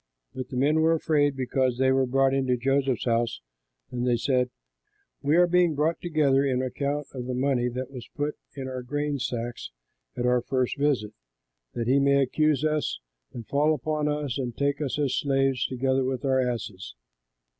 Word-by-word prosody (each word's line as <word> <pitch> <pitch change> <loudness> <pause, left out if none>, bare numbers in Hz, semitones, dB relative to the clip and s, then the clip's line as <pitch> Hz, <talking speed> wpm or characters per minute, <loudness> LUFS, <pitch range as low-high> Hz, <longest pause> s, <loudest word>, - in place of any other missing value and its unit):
But 130 -1 -6
the 125 - -5
men 150 +4 +3
were 165 +1 +4
afraid, 145 -3 +1
because 130 -1 0
they 130 0 +3
were 130 -1 +2
brought 135 +1 +2
into 130 -2 +1
Joseph's 135 0 0
house, 115 - 0 0.5
and 125 -1 -3
they 120 -1 +3
said, 125 0 +1 0.7
"We 145 +3 +2
are 180 - +7
being 175 -2 +3
brought 155 +3 +1
in 165 -3 -3
on 135 -2 +3
account 140 +3 -2
of 125 -2 -5
the 130 - -2
money 130 -2 +1
that 130 +2 -5
was 125 -3 -9
put 145 +1 -2 0.2
in 135 -2 -5
our 130 -1 -4
grain 145 +3 -2
sacks 120 -1 -4 0.5
at 120 - -1
our 125 0 +3
first 130 0 -1
visit, 135 -8 +1 0.6
that 115 - -2
he 135 +3 +4
may 140 0 +4
accuse 155 +2 +1
us 155 - 0 0.3
and 120 -2 -8
fall 150 +2 +2
upon 150 +2 -2
us 150 -4 -2
and 120 -3 -4
take 140 +1 0
us 145 -2 -2
as 145 -3 0
slaves, 135 -2 +1
together 130 +1 0
with 130 0 -2
our 130 -1 +3
asses." 110 - -4
135 Hz, 185 wpm, -26 LUFS, 125-145 Hz, 0.7 s, are